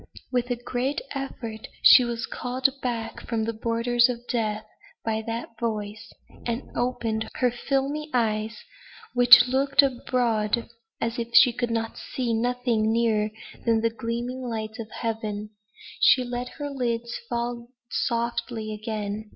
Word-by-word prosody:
With 245 Hz, -1 st, 0 dB
a 245 Hz, -, +1 dB
great 245 Hz, +3 st, -2 dB
effort 235 Hz, -5 st, -5 dB, 0.2 s
she 255 Hz, -, +9 dB
was 235 Hz, -1 st, -2 dB
called 255 Hz, +3 st, 0 dB
back 230 Hz, -3 st, -3 dB
from 230 Hz, -2 st, 0 dB
the 230 Hz, +1 st, -2 dB
borders 235 Hz, +2 st, +2 dB
of 240 Hz, -1 st, -5 dB
death 215 Hz, -3 st, -1 dB, 0.4 s
by 220 Hz, -1 st, 0 dB
that 230 Hz, 0 st, -5 dB
voice, 215 Hz, -1 st, -4 dB, 0.3 s
and 235 Hz, +2 st, -2 dB
opened 235 Hz, -3 st, -1 dB
her 250 Hz, -1 st, +2 dB
filmy 275 Hz, +4 st, -1 dB
eyes, 220 Hz, -2 st, 0 dB, 0.5 s
which 245 Hz, 0 st, +9 dB
looked 275 Hz, +2 st, +4 dB
abroad 240 Hz, -4 st, 0 dB, 0.3 s
as 230 Hz, +1 st, -2 dB
if 235 Hz, 0 st, -4 dB
she 245 Hz, -3 st, +8 dB
could 240 Hz, -1 st, -2 dB, 0.4 s
see 245 Hz, -3 st, 0 dB
nothing 235 Hz, -1 st, +1 dB
nearer 225 Hz, -2 st, +2 dB, 0.3 s
than 225 Hz, -1 st, +2 dB
the 230 Hz, 0 st, +1 dB
gleaming 235 Hz, +3 st, -4 dB
lights 220 Hz, -2 st, -4 dB
of 220 Hz, -1 st, -6 dB
Heaven. 215 Hz, -2 st, -4 dB, 0.5 s
She 255 Hz, -, +6 dB
let 245 Hz, 0 st, -4 dB
the 290 Hz, -1 st, -4 dB
lids 235 Hz, -3 st, -2 dB
fall 235 Hz, 0 st, -3 dB, 0.2 s
softly 235 Hz, -2 st, -1 dB
again. 215 Hz, 0 st, -4 dB
235 Hz, 135 wpm, -26 LUFS, 220-245 Hz, 0.5 s, she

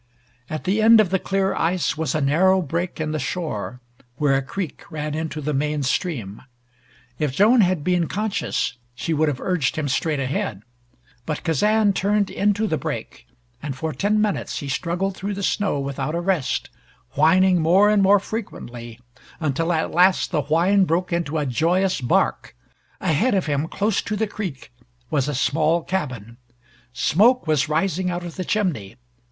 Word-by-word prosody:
At 155 Hz, -, -4 dB
the 200 Hz, +4 st, +1 dB
end 225 Hz, +1 st, +7 dB
of 200 Hz, -5 st, +3 dB
the 190 Hz, -, +2 dB
clear 195 Hz, 0 st, 0 dB
ice 165 Hz, -2 st, 0 dB
was 155 Hz, -3 st, -2 dB
a 155 Hz, -, 0 dB
narrow 180 Hz, +7 st, +3 dB
break 170 Hz, +4 st, -3 dB
in 155 Hz, -1 st, -2 dB
the 155 Hz, -, -2 dB
shore, 125 Hz, -, -4 dB, 0.3 s
where 145 Hz, 0 st, +2 dB
a 135 Hz, -, +1 dB
creek 160 Hz, +5 st, -5 dB
ran 150 Hz, -2 st, -4 dB
into 155 Hz, 0 st, -4 dB
the 150 Hz, +1 st, -2 dB
main 150 Hz, +1 st, -1 dB
stream. 125 Hz, -, -2 dB, 0.8 s
If 150 Hz, -4 st, 0 dB
Joan 220 Hz, -, +5 dB
had 180 Hz, -5 st, +1 dB
been 175 Hz, -1 st, +1 dB
conscious 205 Hz, -11 st, -2 dB, 0.2 s
she 165 Hz, +6 st, -2 dB
would 155 Hz, +1 st, +2 dB
have 140 Hz, -4 st, -1 dB
urged 180 Hz, -8 st, 0 dB
him 155 Hz, -2 st, -2 dB
straight 150 Hz, +2 st, 0 dB
ahead. 130 Hz, -6 st, -3 dB, 0.6 s
But 155 Hz, -2 st, -3 dB
Kazan 205 Hz, +6 st, +2 dB
turned 200 Hz, +1 st, +1 dB
into 205 Hz, +2 st, +1 dB
the 160 Hz, -8 st, -1 dB
break, -, -, -6 dB, 0.3 s
and 140 Hz, -2 st, -4 dB
for 155 Hz, +4 st, -3 dB
ten 210 Hz, +2 st, +1 dB
minutes 210 Hz, -1 st, -1 dB
he 140 Hz, -, -5 dB
struggled 175 Hz, +9 st, -2 dB
through 200 Hz, +1 st, -4 dB
the 200 Hz, -, -5 dB
snow 195 Hz, -6 st, 0 dB
without 140 Hz, +2 st, -3 dB
a -, -, 0 dB
rest, 175 Hz, -5 st, -1 dB, 0.4 s
whining 180 Hz, +4 st, +4 dB
more 190 Hz, +6 st, +5 dB
and 210 Hz, -1 st, +3 dB
more 200 Hz, +1 st, +5 dB
frequently, 120 Hz, -, -7 dB, 0.4 s
until 165 Hz, +2 st, 0 dB
at 160 Hz, -2 st, 0 dB
last 180 Hz, +2 st, +3 dB
the 150 Hz, -, +1 dB
whine 180 Hz, +7 st, +3 dB
broke 175 Hz, +2 st, -1 dB
into 160 Hz, -2 st, -1 dB
a 150 Hz, -, 0 dB
joyous 170 Hz, +7 st, +1 dB
bark. 120 Hz, -, 0 dB, 0.5 s
Ahead 205 Hz, -, +2 dB
of 190 Hz, -, +1 dB
him, 145 Hz, +1 st, -1 dB
close 205 Hz, +3 st, 0 dB
to 210 Hz, -, -3 dB
the 220 Hz, +2 st, 0 dB
creek, 180 Hz, -, -7 dB, 0.4 s
was 140 Hz, -3 st, +1 dB
a 150 Hz, -, -2 dB
small 160 Hz, +5 st, +1 dB
cabin. 125 Hz, -, -4 dB, 0.5 s
Smoke 210 Hz, -, +3 dB
was 155 Hz, -2 st, +1 dB
rising 180 Hz, +3 st, 0 dB
out 175 Hz, 0 st, -3 dB
of 175 Hz, -1 st, -7 dB
the 185 Hz, -, -3 dB
chimney. 155 Hz, -, -1 dB
165 Hz, 175 wpm, -22 LUFS, 145-190 Hz, 0.8 s, end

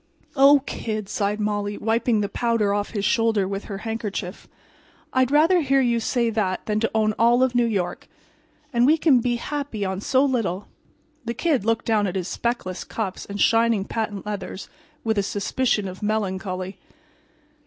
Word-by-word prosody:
"Oh, 280 Hz, 0 st, +6 dB
Kid," 215 Hz, -3 st, -4 dB
sighed 205 Hz, +1 st, -1 dB
Molly, 205 Hz, -1 st, -1 dB
wiping 225 Hz, 0 st, +1 dB
the 200 Hz, -, 0 dB
powder 230 Hz, -2 st, 0 dB
off 205 Hz, 0 st, -1 dB
his 205 Hz, -3 st, -3 dB
shoulder 225 Hz, -5 st, +2 dB
with 195 Hz, +1 st, -4 dB
her 200 Hz, -, -5 dB
handkerchief, 210 Hz, -4 st, -4 dB, 0.7 s
"I'd 260 Hz, -1 st, +3 dB
rather 325 Hz, +5 st, +4 dB
hear 275 Hz, -2 st, +2 dB
you 240 Hz, -3 st, +2 dB
say 235 Hz, 0 st, 0 dB
that 200 Hz, -4 st, -1 dB
than 210 Hz, 0 st, 0 dB
to 225 Hz, -, +1 dB
own 215 Hz, -1 st, +2 dB
all 240 Hz, +2 st, +5 dB
of 260 Hz, -1 st, +1 dB
New 240 Hz, -1 st, +3 dB
York. 185 Hz, -6 st, -2 dB, 0.7 s
And 240 Hz, +1 st, +4 dB
we 310 Hz, +3 st, +5 dB
can 295 Hz, -6 st, +4 dB
be 240 Hz, 0 st, 0 dB
happy 275 Hz, -4 st, -4 dB
on 190 Hz, 0 st, -3 dB
so 265 Hz, +5 st, +3 dB
little!" 215 Hz, -8 st, -1 dB, 0.6 s
The 235 Hz, +1 st, -3 dB
Kid 280 Hz, -, 0 dB
looked 225 Hz, 0 st, 0 dB
down 215 Hz, -3 st, +2 dB
at 185 Hz, -, -4 dB
his 185 Hz, -2 st, -2 dB
speckless 235 Hz, -7 st, -3 dB
cuffs 200 Hz, -5 st, -5 dB
and 200 Hz, 0 st, -6 dB
shining 225 Hz, -3 st, +3 dB
patent 210 Hz, -3 st, -3 dB
leathers 205 Hz, -2 st, -6 dB, 0.3 s
with 220 Hz, -2 st, +1 dB
a -, -, +1 dB
suspicion 210 Hz, +1 st, 0 dB
of 185 Hz, 0 st, -8 dB
melancholy. 190 Hz, -3 st, -2 dB
220 Hz, 175 wpm, -23 LUFS, 200-240 Hz, 0.7 s, Oh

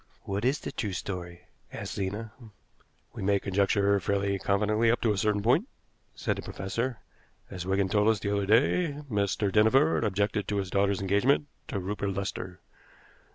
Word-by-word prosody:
"What 100 Hz, +1 st, -3 dB
is 135 Hz, +4 st, +2 dB
the -, -, -6 dB
true 105 Hz, -3 st, -3 dB
story?" 90 Hz, -2 st, -5 dB, 0.3 s
asked -, -, -6 dB
Zena. 105 Hz, +3 st, -3 dB, 0.8 s
"We -, -, -7 dB
may 100 Hz, +1 st, +2 dB
conjecture 100 Hz, +1 st, +2 dB
fairly 100 Hz, +1 st, 0 dB
confidently 105 Hz, +4 st, +2 dB
up 120 Hz, -, +2 dB
to 115 Hz, -, +2 dB
a 105 Hz, -, -1 dB
certain 105 Hz, -1 st, +1 dB
point," 120 Hz, +3 st, +3 dB, 0.5 s
said -, -, -1 dB
the -, -, -4 dB
professor. 115 Hz, +6 st, -3 dB, 0.5 s
"As 90 Hz, -1 st, -6 dB
Wigan 95 Hz, 0 st, +2 dB
told 105 Hz, +2 st, +2 dB
us 110 Hz, -1 st, +4 dB
the 100 Hz, 0 st, -1 dB
other 100 Hz, -1 st, -1 dB
day, 145 Hz, -, +3 dB, 0.2 s
Mr. 100 Hz, -1 st, 0 dB
Dinneford 115 Hz, +9 st, +4 dB
objected 105 Hz, 0 st, 0 dB
to 105 Hz, -, -1 dB
his 95 Hz, -2 st, -2 dB
daughter's 100 Hz, 0 st, +1 dB
engagement 105 Hz, +10 st, +2 dB, 0.2 s
to -, -, -3 dB
Rupert 100 Hz, +1 st, -3 dB
Lester. 95 Hz, -2 st, -5 dB
100 Hz, 165 wpm, -28 LUFS, 95-110 Hz, 0.8 s, us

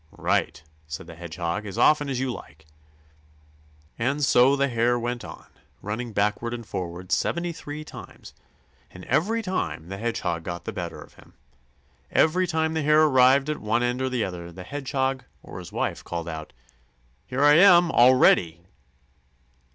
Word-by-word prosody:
"Right!" 75 Hz, -, -1 dB, 0.2 s
said 80 Hz, +2 st, -7 dB
the 85 Hz, -, -11 dB
Hedgehog. 85 Hz, +4 st, -4 dB
"As 95 Hz, -, -7 dB
often 145 Hz, -2 st, +4 dB
as 130 Hz, -2 st, -2 dB
you 130 Hz, -1 st, -1 dB
like." 75 Hz, -3 st, -12 dB, 1.3 s
And 140 Hz, +5 st, 0 dB
so 130 Hz, +2 st, +5 dB
the 140 Hz, 0 st, +1 dB
Hare 120 Hz, -1 st, +1 dB
went 120 Hz, 0 st, -3 dB
on, -, -, -10 dB, 0.4 s
running 110 Hz, +4 st, -4 dB
backward 105 Hz, +3 st, -1 dB
and 120 Hz, -1 st, -8 dB
forward 90 Hz, -1 st, -6 dB
seventy 170 Hz, 0 st, 0 dB
three 150 Hz, -2 st, -8 dB
times, -, -, -12 dB, 0.6 s
and 90 Hz, 0 st, -12 dB
every 225 Hz, +8 st, 0 dB
time 85 Hz, -, -3 dB
the 95 Hz, 0 st, -6 dB
Hedgehog 110 Hz, -7 st, -2 dB
got 85 Hz, 0 st, -6 dB
the -, -, -5 dB
better -, -, -6 dB
of -, -, -13 dB
him. -, -, -21 dB, 0.8 s
Every 180 Hz, +4 st, +3 dB
time 160 Hz, -1 st, 0 dB
the 160 Hz, -, -1 dB
Hare 150 Hz, +1 st, +4 dB
arrived 135 Hz, -1 st, +4 dB
at 150 Hz, -1 st, -2 dB
one 110 Hz, +3 st, 0 dB
end 125 Hz, +1 st, -1 dB
or 130 Hz, -, 0 dB
the 125 Hz, -3 st, -1 dB
other, 85 Hz, -2 st, -7 dB
the 90 Hz, +2 st, -10 dB
Hedgehog 135 Hz, +2 st, -2 dB, 0.2 s
or -, -, -9 dB
his -, -, -10 dB
wife -, -, -3 dB
called 85 Hz, -1 st, -5 dB
out: 80 Hz, -2 st, -7 dB, 0.8 s
"Here 135 Hz, +3 st, -1 dB
I 145 Hz, +1 st, +7 dB
am 175 Hz, -3 st, +6 dB
already!" 105 Hz, -9 st, +4 dB
120 Hz, 165 wpm, -25 LUFS, 90-145 Hz, 1.3 s, I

